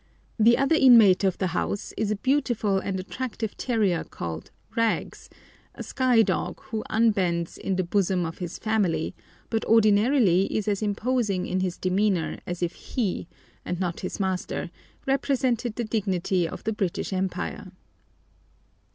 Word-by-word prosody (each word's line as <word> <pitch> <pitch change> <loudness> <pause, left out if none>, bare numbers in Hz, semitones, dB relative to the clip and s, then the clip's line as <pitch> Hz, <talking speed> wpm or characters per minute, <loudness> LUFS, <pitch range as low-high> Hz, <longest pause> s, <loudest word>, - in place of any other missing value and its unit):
The 235 +2 +6
other 275 +3 +2
inmate 230 - +7
of 190 -2 +1
the 190 - -1
house 200 +2 -2
is 220 -2 -1
a 215 - +1
beautiful 240 -5 +1
and 190 0 -3
attractive 220 +2 -5
terrier 210 -9 0
called 80 -1 -7 0.3
"Rags," 230 -1 -1 0.5
a - - -6
Skye 250 -4 +3
dog, 180 -3 -2
who 220 -1 -5
unbends 190 -7 +1
"in 195 - -2
the 185 - 0
bosom 180 -1 +1
of 165 - -6
his 175 -1 -5
family," 200 - 0 0.4
but 225 -1 0
ordinarily 215 -2 +4
is 215 - -1
as 205 -1 0
imposing 210 -2 0
in 185 - -1
his 185 -2 -2
demeanour 185 -2 0
as 175 0 -3
if 175 - -1
he, 205 -8 -3 0.4
and 180 - -4
not 175 -3 -2
his 185 - -5
master, 185 -2 -2 0.3
represented 260 -4 0
the 240 - -2
dignity 190 -5 0
of - - -8
the 220 - -1
British 195 -2 -2
Empire. 185 0 -3
200 Hz, 150 wpm, -26 LUFS, 185-225 Hz, 0.5 s, inmate